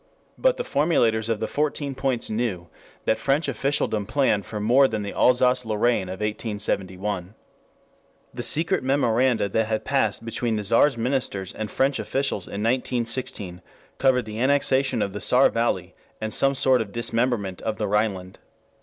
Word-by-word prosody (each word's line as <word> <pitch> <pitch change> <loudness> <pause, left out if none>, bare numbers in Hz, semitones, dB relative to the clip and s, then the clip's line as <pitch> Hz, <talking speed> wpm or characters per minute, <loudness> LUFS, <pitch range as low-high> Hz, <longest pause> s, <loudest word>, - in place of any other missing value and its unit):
But - - +2
the 485 - -2
formulators 115 - +1
of 115 -2 0
the 110 - -2
Fourteen 145 -1 -2
Points 130 -3 -1
knew 110 -7 -2 0.4
that 110 - +1
French 140 +3 +1
officialdom 120 -5 -1
planned 105 -9 +1
for 105 - -5
more 125 +6 +4
than 110 -4 -3
the 100 - -5
Alsace 125 0 +3
Lorraine 110 -3 0
of 95 +2 -7
1871. 105 -3 -3 1.0
The - - -5
secret 165 0 +2
memoranda 130 -4 +2
that 110 +2 0
had 110 -1 -2
passed 115 -5 0
between 115 0 -1
the 105 - -2
Czar's 115 +6 +3
ministers 115 -6 -2
and 110 -1 -5
French 135 +4 +1
officials 135 -8 -2
in 100 +1 -5
1916 115 -6 -2 0.4
covered 130 -3 +3
the 110 0 -6
annexation 130 -2 +2
of 100 - -4
the 105 - -6
Saar 125 +2 +5
Valley 95 -6 -1 0.3
and 110 -1 -3
some 135 0 +2
sort 130 -2 +3
of 105 -3 -6
dismemberment 115 -4 -1
of 110 -1 -3
the 105 - -2
Rhineland. 100 -3 -1
115 Hz, 160 wpm, -24 LUFS, 105-130 Hz, 1.0 s, Saar